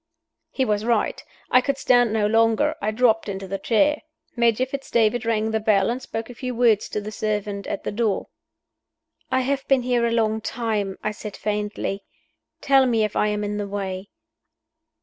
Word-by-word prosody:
He 265 - -1
was 210 -2 0
right. 235 0 0 0.3
I 255 - +6
could 275 +1 -1
stand 245 -3 +3
no 215 -1 +1
longer; 225 +7 +3
I 210 - 0
dropped 225 -1 +2
into 195 -1 -5
the 195 +1 -4
chair. 290 +9 +2 0.3
Major 235 +1 +2
Fitz 270 +1 -7
David 230 +1 +2
rang 220 -1 +1
the 220 - +1
bell, 210 -1 +2
and 250 +2 -4
spoke 225 -3 -5
a 245 - -9
few 250 0 -5
words 230 -3 +3
to 210 - -3
the 210 +1 -6
servant 210 -2 -3
at - - -4
the - - -3
door. 215 -2 0 1.0
"I 260 0 +2
have 270 +1 -2
been 270 -2 +3
here 240 -1 +1
a - - -1
long 220 -1 +1
time," 215 -5 -2
I 215 - 0
said, 210 0 -8
faintly. 210 -1 -3 0.6
"Tell 270 -1 +4
me 225 -3 +2
if 210 - -2
I 210 - +2
am 210 0 -1
in 205 0 -2
the 205 -1 -3
way." 195 -1 -4
220 Hz, 190 wpm, -23 LUFS, 210-245 Hz, 1.0 s, I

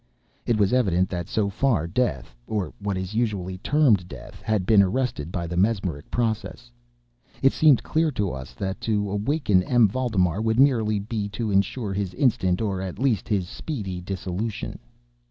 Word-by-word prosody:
It 120 -2 +2
was 100 +1 +2
evident 95 -8 +2
that, 85 -2 -4
so 105 -2 0
far, 110 - +1
death 85 - -2
(or 105 -4 -2
what 100 -2 -2
is 95 +2 -4
usually 100 -5 -1
termed 115 - +3
death) - - -11
had 105 -4 0
been 105 0 +6
arrested 100 - -1
by 85 -2 -3
the 85 +1 -4
mesmeric 95 -6 0
process. 110 - -2 0.7
It 135 - +5
seemed 150 -6 +5
clear 160 0 +1
to 100 -6 -1
us 65 -1 -8
all 100 - -3
that 95 0 -4
to 105 -3 0
awaken 105 -1 +1
M. 120 +3 +4
Valdemar 100 -5 0
would 110 0 +1
be 135 - +8
merely 110 -7 +1 0.3
to 110 -1 -2
insure 100 +2 0
his 95 -2 -3
instant, 95 -7 +1
or 95 -3 -1
at 95 -2 -5
least 125 -7 0
his 100 -5 0
speedy, 95 - -5
dissolution. 95 +3 -4
100 Hz, 170 wpm, -24 LUFS, 90-115 Hz, 0.7 s, be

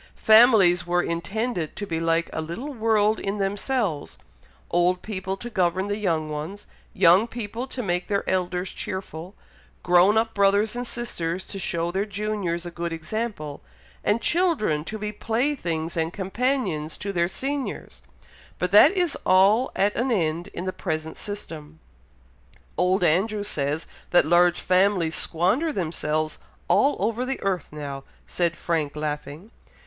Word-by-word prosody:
Families 215 -6 +6
were 175 0 +2
intended 175 +1 -2
to 205 - -4
be 165 -4 -3
like 165 0 +1
a 160 - -2
little 195 - -6
world 220 -2 +2
in 200 +1 -3
themselves 200 - -2 0.5
old 180 +1 +2
people 190 -2 -4
to 240 - -7
govern 190 -2 0
the 205 - -1
young 165 -6 0
ones 155 +7 -6 0.3
young 185 +4 +5
people 235 +2 -5
to 255 -1 -5
make 180 -2 -1
their 200 -1 -1
elders 180 0 -1
cheerful 185 -1 -6 0.5
grown 180 +4 +5
up 225 0 +1
brothers 200 +2 +3
and 245 0 -4
sisters 185 -8 -3
to 195 - -7
show 170 -1 -1
their 195 +3 -1
juniors 200 -4 -2
a 175 - -6
good 170 0 -4
example 165 -2 -4 0.4
and 215 +3 +1
children 320 - +1
to 215 +7 -6
be 210 0 -4
playthings 215 - -2
and 165 +1 -1
companions 195 - -1
to 200 0 -4
their 170 -1 +2
seniors, 275 +7 -4 0.6
but 180 - -2
that 210 +8 +8
is 355 -6 0
all 195 +7 +4
at 205 +1 +2
an 250 +3 -1
end 170 -4 0
in 180 - -6
the 185 - -2
present 155 0 -4
system." 160 -7 -8 1.0
"Old 180 +1 +2
Andrew 205 +6 +2
says 150 -5 -2 0.2
that 175 - +4
large 175 +2 +4
families 185 -3 +2
'squander' 195 - +1
themselves 155 - -2 0.3
all 280 - +3
over 225 +4 -1
the 265 +1 -3
earth 190 -5 -1
now," 140 -2 -6 0.2
said 170 -1 -1
Frank, 155 -4 -1
laughing. 150 +6 -5
190 Hz, 150 wpm, -24 LUFS, 170-215 Hz, 1.0 s, that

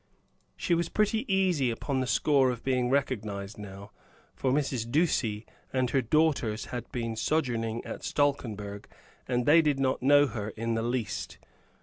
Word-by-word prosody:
She 175 - 0
was 170 0 +1
pretty 215 +2 0
easy 180 -9 +2
upon 130 +4 -2
the 130 - -1
score 135 -1 +3
of 120 -2 -4
being 125 -2 +1
recognized 110 -7 -2
now; 100 0 -9 0.4
for 130 - -1
Mrs. 130 -5 -1
Ducie 120 -9 +1 0.3
and 130 -2 0
her 135 - +3
daughters 130 -5 +1
had 120 - -5
been 115 -2 -3
sojourning 115 -4 -1
at - - -7
Stalkenberg, 110 -8 -1 0.4
and 125 -1 0
they 165 +3 +7
did 150 -3 +1
not 130 -1 +1
know 145 +2 +6
her 110 -5 -4
in 115 +1 -1
the 115 - 0
least. 120 -1 -3
130 Hz, 155 wpm, -29 LUFS, 115-145 Hz, 0.4 s, they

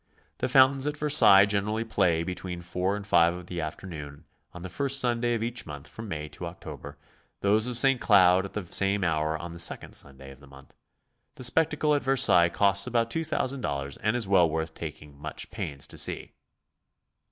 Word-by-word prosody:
The - - 0
fountains 135 +1 +5
at 150 0 -3
Versailles 145 -10 +6
generally 105 +2 -1
play 90 -7 +1
between 90 0 -6
4 90 +3 -2
and 105 -1 -7
5 85 -4 +4
of 90 0 -9
the 90 -1 -5
afternoon 75 -3 -8 0.3
on 90 - -11
the - - -5
first 135 +8 -1
Sunday 120 -1 0
of 115 - -3
each 120 -3 -3
month 70 -2 -9
from 110 0 -9
May 75 -5 -5
to 85 - -8
October; 85 +1 -10 0.4
those 105 +3 +2
of 125 -2 -2
St. 135 0 +3
Cloud 95 -3 +5
at 100 - -9
the 105 -3 -4
same 100 +3 0
hour 80 -2 0
on 85 +1 -8
the 85 - -9
second - - -1
Sunday 70 -1 -8
oi - - -12
the 70 - -17
month. 70 0 -17 0.6
The - - -9
spectacle 150 +3 +1
at 145 - 0
Ver 135 0 +1
sailles 85 -7 +5
costs 100 +3 +2
about 115 -2 0
$2000 130 - -3
and 110 +2 0
is 120 -5 -1
well 90 -4 +4
worth 80 +1 -3
taking 75 -3 -9
much 75 0 -7
pains 70 0 -5
to - - -6
see. - - -3
95 Hz, 195 wpm, -27 LUFS, 80-120 Hz, 0.6 s, Versailles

